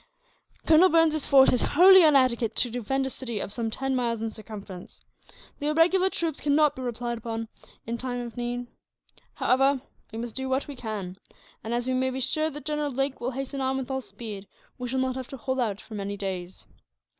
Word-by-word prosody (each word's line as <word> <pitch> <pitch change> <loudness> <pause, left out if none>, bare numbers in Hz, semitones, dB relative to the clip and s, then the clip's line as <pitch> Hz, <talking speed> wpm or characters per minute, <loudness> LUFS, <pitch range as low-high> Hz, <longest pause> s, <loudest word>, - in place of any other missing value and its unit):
Colonel 330 +4 +6
Burns's 320 -3 +3
force 270 -2 +6
is 250 - +2
wholly 375 +3 +7
inadequate 255 -7 +3
to 245 - +1
defend 255 +3 -1
a - - -2
city 235 -5 -4
of 200 - -4
some 230 -1 -2
ten 270 +4 -1
miles 235 -2 0
in 225 0 -3
circumference. 205 -4 -10 0.6
The 290 - -2
irregular 350 +5 +4
troops 330 -5 -3
cannot 300 0 +3
be 260 - -7
relied 240 -1 -3
upon, 225 0 -5 0.4
in 235 +1 -4
case 245 -1 -3
of 235 -2 -9
need. 245 0 -3 0.7
However, 270 +1 +2 0.3
we 220 - -7
must 230 -1 -5
do 265 0 -4
what 265 +1 0
we 285 - -7
can 205 -6 -5 0.5
and, 220 - -5
as 240 0 -1
we 260 - -1
may 260 0 +1
be 260 0 -4
sure 310 +5 +1
that 295 -2 -9
General 300 -1 -1
Lake 270 +1 -2
will 245 - -1
hasten 270 +1 -5
on 265 0 0
with 265 0 -4
all 265 0 -1
speed, 210 -5 -8 0.3
we 250 - -3
shall 260 - -2
not 260 0 0
have 260 -1 -5
to 270 - -8
hold 260 +2 -2
out 210 -5 -1
for - - -13
many 200 -1 -4
days. 185 -2 -5
255 Hz, 205 wpm, -26 LUFS, 230-275 Hz, 0.7 s, wholly